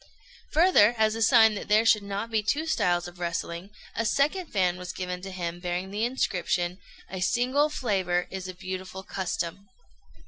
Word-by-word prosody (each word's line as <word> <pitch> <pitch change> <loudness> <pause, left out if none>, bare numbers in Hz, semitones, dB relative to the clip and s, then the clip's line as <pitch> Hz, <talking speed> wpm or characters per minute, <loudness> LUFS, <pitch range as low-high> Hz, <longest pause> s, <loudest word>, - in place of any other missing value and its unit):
Further, 305 - +5
as 220 0 +3
a 225 - -4
sign 225 -2 +6
that 205 - -6
there 215 +2 +4
should 220 -2 +5
not 200 +3 -4
be 220 -1 +2
two 285 +9 0
styles 175 - +1
of 175 0 -12
wrestling, 170 +1 -3 0.3
a 230 - 0
second 300 - +1
fan 180 -6 +1
was 180 -1 -6
given 180 -1 -4
to 195 - -7
him 175 -2 -4
bearing 180 +1 -3
the 210 +3 0
inscription, 180 -7 -1 0.3
"A 190 -1 -6
single 255 +9 +2
flavour 190 -10 0
is 190 -1 -5
a 185 - -7
beautiful 185 0 -6
custom." 185 +1 -4
190 Hz, 175 wpm, -27 LUFS, 180-225 Hz, 0.3 s, sign